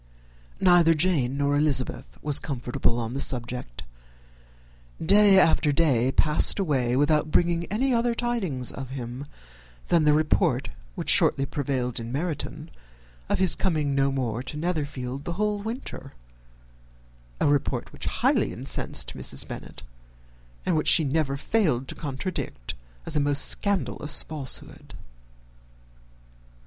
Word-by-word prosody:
Neither 175 Hz, -3 st, +5 dB
Jane 145 Hz, -6 st, +1 dB
nor 145 Hz, 0 st, +1 dB
Elizabeth 145 Hz, -3 st, 0 dB
were 150 Hz, -, -2 dB
comfortable 125 Hz, -4 st, -1 dB
on 115 Hz, 0 st, -4 dB
this 140 Hz, -, +4 dB
subject. 125 Hz, -, 0 dB, 1.2 s
Day 200 Hz, +2 st, +5 dB
after 160 Hz, -4 st, +4 dB
day 135 Hz, -5 st, +2 dB
passed 150 Hz, +2 st, +4 dB
away 135 Hz, -10 st, 0 dB
without 150 Hz, +2 st, +2 dB
bringing 170 Hz, +1 st, +1 dB
any 250 Hz, +8 st, 0 dB
other 235 Hz, 0 st, +1 dB
tidings 195 Hz, -, -2 dB
of 135 Hz, -2 st, -8 dB
him 130 Hz, +1 st, -7 dB, 0.6 s
than 170 Hz, -2 st, +3 dB
the 150 Hz, 0 st, +4 dB
report 155 Hz, +1 st, +1 dB, 0.3 s
which -, -, 0 dB
shortly 135 Hz, -, +3 dB
prevailed 130 Hz, -4 st, -3 dB
in 115 Hz, 0 st, -6 dB
Meryton 155 Hz, +3 st, -4 dB, 0.6 s
of -, -, +1 dB
his 185 Hz, -2 st, +5 dB
coming 155 Hz, -6 st, -1 dB
no 135 Hz, 0 st, +1 dB
more 125 Hz, -4 st, -2 dB
to 150 Hz, +3 st, -7 dB
Netherfield 145 Hz, -5 st, -3 dB
the 170 Hz, -, -4 dB
whole 210 Hz, +2 st, -1 dB
winter; 220 Hz, -, -7 dB, 1.3 s
a -, -, +1 dB
report 145 Hz, -1 st, 0 dB
which -, -, -8 dB
highly -, -, +1 dB
incensed -, -, -3 dB
Mrs. -, -, -3 dB
Bennet, -, -, -9 dB, 0.8 s
and -, -, +1 dB
which 155 Hz, -, 0 dB
she 165 Hz, -, +6 dB
never 140 Hz, -1 st, -1 dB
failed 150 Hz, -, 0 dB
to -, -, -4 dB
contradict 140 Hz, -, -5 dB, 0.3 s
as -, -, -2 dB
a -, -, +3 dB
most 145 Hz, 0 st, +3 dB
scandalous 160 Hz, -6 st, 0 dB
falsehood. 145 Hz, -5 st, -5 dB
145 Hz, 130 wpm, -25 LUFS, 130-170 Hz, 1.3 s, she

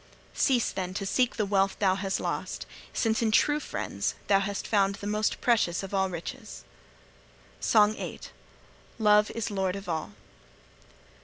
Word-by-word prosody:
Cease, 250 Hz, -4 st, +2 dB
then, 185 Hz, -1 st, -4 dB
to 195 Hz, -, -3 dB
seek 250 Hz, +5 st, +1 dB
the 215 Hz, -, 0 dB
wealth 195 Hz, -1 st, +1 dB
thou 190 Hz, -2 st, +3 dB
hast 195 Hz, 0 st, -2 dB
lost, -, -, -3 dB, 0.3 s
since 225 Hz, +1 st, 0 dB
in 225 Hz, -, +2 dB
true 295 Hz, +7 st, +3 dB
friends -, -, -3 dB
thou 195 Hz, -1 st, +4 dB
hast 200 Hz, 0 st, -3 dB
found 200 Hz, -2 st, +2 dB
the 200 Hz, -, -9 dB
most 210 Hz, +1 st, 0 dB
precious 215 Hz, -7 st, +2 dB
of 195 Hz, -, -7 dB
all 190 Hz, -1 st, +2 dB
riches.' 170 Hz, -2 st, -7 dB, 1.0 s
SONG 210 Hz, -1 st, +4 dB
VIII. -, -, -6 dB, 0.8 s
LOVE 210 Hz, -1 st, +4 dB
IS 230 Hz, -1 st, -2 dB
LORD 190 Hz, -2 st, -1 dB
OF 195 Hz, -1 st, -8 dB
ALL. 160 Hz, -2 st, -3 dB
200 Hz, 155 wpm, -28 LUFS, 195-215 Hz, 1.0 s, thou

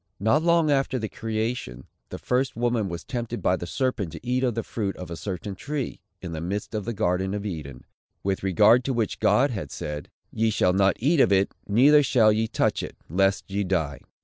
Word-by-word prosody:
Not 110 Hz, +10 st, +3 dB
long 170 Hz, -2 st, +3 dB
after 135 Hz, -2 st, +1 dB
the 110 Hz, -3 st, -3 dB
creation, 110 Hz, -, -4 dB, 0.2 s
the -, -, -6 dB
first 125 Hz, +1 st, -1 dB
woman 120 Hz, -3 st, 0 dB
was 85 Hz, -1 st, -6 dB
tempted 120 Hz, -1 st, -4 dB
by 90 Hz, -, +2 dB
the 85 Hz, -1 st, -6 dB
serpent 120 Hz, -, -1 dB
to 80 Hz, -, -10 dB
eat 125 Hz, +1 st, 0 dB
of 125 Hz, -4 st, +1 dB
the 115 Hz, -, -2 dB
fruit 100 Hz, -4 st, -3 dB
of 90 Hz, -2 st, -8 dB
a -, -, -3 dB
certain 95 Hz, +2 st, -5 dB
tree, 140 Hz, +6 st, -4 dB, 0.2 s
in 90 Hz, -, -5 dB
the 80 Hz, -1 st, -4 dB
midst 100 Hz, +6 st, -4 dB
of 105 Hz, -2 st, -3 dB
the 120 Hz, -, -2 dB
garden 95 Hz, 0 st, 0 dB
of 105 Hz, 0 st, -4 dB
Eden, 75 Hz, -9 st, -6 dB, 0.4 s
with 95 Hz, -1 st, -1 dB
regard 105 Hz, +6 st, +5 dB
to 135 Hz, -, 0 dB
which 115 Hz, -3 st, -1 dB
God 110 Hz, +6 st, +3 dB
had 100 Hz, -7 st, -5 dB
said, 75 Hz, -1 st, -6 dB, 0.2 s
"Ye 110 Hz, 0 st, +1 dB
shall 95 Hz, -4 st, +2 dB
not 95 Hz, 0 st, +3 dB
eat 150 Hz, +6 st, +2 dB
of 130 Hz, -, +5 dB
it, 95 Hz, 0 st, +2 dB
neither 135 Hz, +8 st, +6 dB
shall 120 Hz, -5 st, +4 dB
ye 110 Hz, +1 st, +1 dB
touch -, -, 0 dB
it, -, -, -7 dB
lest 95 Hz, +2 st, +1 dB
ye 100 Hz, +1 st, 0 dB
die." 80 Hz, -7 st, -1 dB
105 Hz, 215 wpm, -25 LUFS, 95-120 Hz, 0.4 s, neither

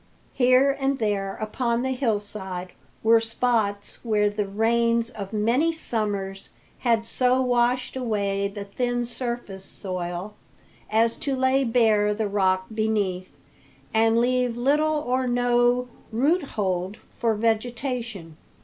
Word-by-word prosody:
Here 255 Hz, +2 st, +4 dB
and 270 Hz, 0 st, +1 dB
there 200 Hz, -4 st, -1 dB
upon 235 Hz, +2 st, -1 dB
the 260 Hz, -, -1 dB
hillside 205 Hz, -7 st, -2 dB, 0.3 s
were 225 Hz, +1 st, +6 dB
spots 225 Hz, -3 st, -1 dB
where 210 Hz, -3 st, +2 dB
the 205 Hz, -1 st, -2 dB
rains 230 Hz, +3 st, +1 dB
of 200 Hz, -5 st, -7 dB
many 235 Hz, +10 st, +2 dB
summers 205 Hz, -10 st, -3 dB, 0.3 s
had 230 Hz, -2 st, +1 dB
so 255 Hz, +2 st, +2 dB
washed 250 Hz, 0 st, +1 dB
away 200 Hz, -5 st, -1 dB
the 200 Hz, 0 st, -7 dB
thin 245 Hz, +4 st, -2 dB
surface 235 Hz, -6 st, -4 dB
soil 185 Hz, +1 st, -5 dB, 0.6 s
as 225 Hz, +1 st, +2 dB
to 275 Hz, -2 st, -2 dB
lay 260 Hz, +1 st, +2 dB
bare 220 Hz, -4 st, +3 dB
the 220 Hz, 0 st, -1 dB
rock 190 Hz, -2 st, +1 dB
beneath 205 Hz, -4 st, -1 dB, 0.6 s
and 225 Hz, +1 st, +3 dB
leave 245 Hz, 0 st, +1 dB
little 300 Hz, +5 st, +2 dB
or 255 Hz, +1 st, 0 dB
no 245 Hz, 0 st, +2 dB, 0.2 s
roothold 220 Hz, -, 0 dB, 0.2 s
for 230 Hz, -2 st, 0 dB
vegetation. 230 Hz, -, -2 dB
225 Hz, 120 wpm, -25 LUFS, 205-250 Hz, 0.6 s, were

